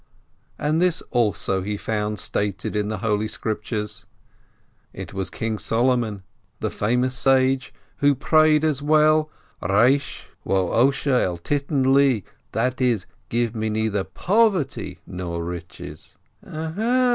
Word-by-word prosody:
And 155 +3 0
this 180 -2 +2
also 105 -5 +1
he 105 +2 -3
found 105 0 -2
stated 100 +1 -2
in 105 -1 0
the 110 0 -2
Holy 105 0 +1
Scriptures. 105 -1 -4 0.9
It - - -8
was 95 -2 -3
King 110 +2 -3
Solomon, 115 -4 +1 0.4
the - - -2
famous 125 +4 0
sage, 130 0 +2 0.3
who 145 0 +3
prayed 155 +2 +4
as 150 -3 +1
well: 155 +1 +4 0.3
Resh 120 +10 +2 0.2
wo 95 -2 +1
Osher 135 +1 +2
al 90 -1 -1
titten 140 - +1
li, 135 -7 +4 0.3
that 125 +3 -1
is, 120 -7 +2 0.2
"Give 120 -1 0
me 110 0 -1
neither 105 -2 0
poverty 195 - +1
nor 85 -2 -4
riches." 85 -1 -8
120 Hz, 120 wpm, -23 LUFS, 105-140 Hz, 0.9 s, prayed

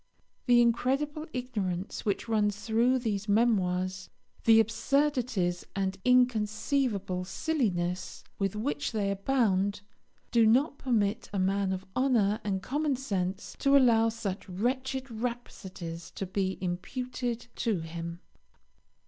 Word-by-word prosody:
The 240 -1 +6
incredible 275 +6 0
ignorance 210 - -3
which 205 +2 -1
runs 210 -2 0
through 235 +3 +3
those 215 -4 -2
memoirs, 190 -4 +1 0.4
the 225 -1 +7
absurdities 230 -5 +1
and 190 -1 -1
inconceivable 220 -4 +1
silliness 185 - -2 0.2
with 195 0 0
which 255 +4 -2
they 200 -2 0
abound, 200 -2 +1 0.5
do 230 -2 +5
not 275 +6 +3
permit 220 -6 0
a 200 - -3
man 195 +1 +1
of 190 0 -4
honour 230 -6 +2
and 195 -2 -2
common 290 +2 0
sense 195 -6 -3
to 280 0 +5
allow 230 -4 +5
such 210 -4 -5
wretched 260 +6 -2
rhapsodies 195 -8 -6
to 195 - -3
be 190 0 -1
imputed 240 +7 -3
to 220 -8 0
him. 170 +1 -6
220 Hz, 115 wpm, -29 LUFS, 190-250 Hz, 0.5 s, the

